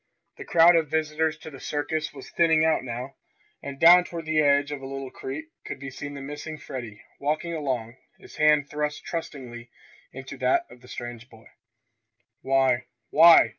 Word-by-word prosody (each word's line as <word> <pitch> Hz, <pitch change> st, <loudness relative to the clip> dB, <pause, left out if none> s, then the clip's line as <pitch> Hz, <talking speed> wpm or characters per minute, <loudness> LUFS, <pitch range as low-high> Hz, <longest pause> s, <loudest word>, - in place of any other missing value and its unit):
The -, -, -8 dB
crowd 170 Hz, +1 st, +6 dB
of 160 Hz, -3 st, +2 dB
visitors 155 Hz, 0 st, 0 dB
to 160 Hz, 0 st, -10 dB
the 135 Hz, -, -11 dB
circus 150 Hz, +2 st, -2 dB
was 135 Hz, -2 st, -11 dB
thinning 160 Hz, -2 st, +3 dB
out 160 Hz, -3 st, +2 dB
now, 125 Hz, +2 st, -6 dB, 0.4 s
and 140 Hz, -1 st, -7 dB
down 175 Hz, +2 st, +8 dB
toward 170 Hz, -2 st, -7 dB
the 160 Hz, 0 st, +1 dB
edge 145 Hz, 0 st, +3 dB
of 145 Hz, -2 st, -5 dB
a 135 Hz, -, -7 dB
little 135 Hz, -1 st, -6 dB
creek 140 Hz, +4 st, -6 dB, 0.2 s
could -, -, -6 dB
be 140 Hz, 0 st, -8 dB
seen 145 Hz, +2 st, -7 dB
the 140 Hz, -, -7 dB
missing 145 Hz, +3 st, -7 dB
Freddie 120 Hz, -7 st, -8 dB, 0.2 s
walking 155 Hz, +4 st, -1 dB
along, 130 Hz, -6 st, -3 dB, 0.2 s
his -, -, -15 dB
hand 150 Hz, -1 st, +4 dB
thrust 150 Hz, 0 st, -3 dB
trustingly 125 Hz, -8 st, -6 dB, 0.4 s
into -, -, -9 dB
that 350 Hz, 0 st, +2 dB
of 125 Hz, -, -15 dB
the -, -, -16 dB
strange 120 Hz, 0 st, -8 dB
boy. 115 Hz, 0 st, -17 dB, 1.0 s
"Why 135 Hz, -2 st, +2 dB, 0.3 s
why!" 165 Hz, -6 st, +8 dB
145 Hz, 175 wpm, -26 LUFS, 130-160 Hz, 1.0 s, down